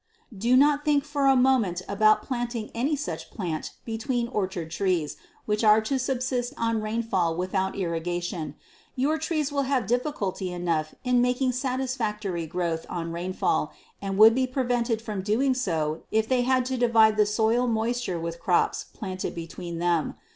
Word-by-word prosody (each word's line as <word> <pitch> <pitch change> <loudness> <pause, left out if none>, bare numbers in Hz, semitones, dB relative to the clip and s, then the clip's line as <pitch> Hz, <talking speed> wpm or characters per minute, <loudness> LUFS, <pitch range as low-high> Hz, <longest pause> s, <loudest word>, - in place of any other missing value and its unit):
Do 235 +6 +3
not 290 +1 +4
think 295 -2 +2
for 290 -1 0
a 270 - +6
moment 245 -9 +2
about 215 +2 +3
planting 240 -3 -3
any 270 +6 0
such 300 +1 -5
plant 170 -7 -4
between 235 +1 -2
orchard 185 -7 -3
trees 175 -4 0 0.3
which 210 +1 0
are 215 0 +7
to 265 +5 -1
subsist 255 0 -1
on 230 -1 0
rainfall 215 -6 0
without 190 +2 -1
irrigation. 170 -3 -3 0.4
Your 295 +5 +1
trees 310 -2 -1
will 280 -1 +1
have 265 -5 +1
difficulty 205 -6 -1
enough 170 -3 -2
in 250 -1 +3
making 250 +1 +1
satisfactory 235 - -2
growth 170 -1 -2
on 170 -1 -4
rainfall, 180 +2 -1 0.3
and 195 -1 -3
would 220 +2 +8
be 260 +1 +1
prevented 245 -3 0
from 210 -4 -4
doing 230 +7 +2
so 160 -11 -1
if 220 0 +1
they 255 0 +2
had 255 0 +2
to 260 0 -2
divide 225 -3 +5
the 210 -1 +3
soil 225 +3 +2
moisture 230 -4 -1
with 165 0 -5
crops 175 0 +1
planted 185 -3 -4
between 170 0 -6
them. 170 -2 0
220 Hz, 160 wpm, -26 LUFS, 180-255 Hz, 0.4 s, would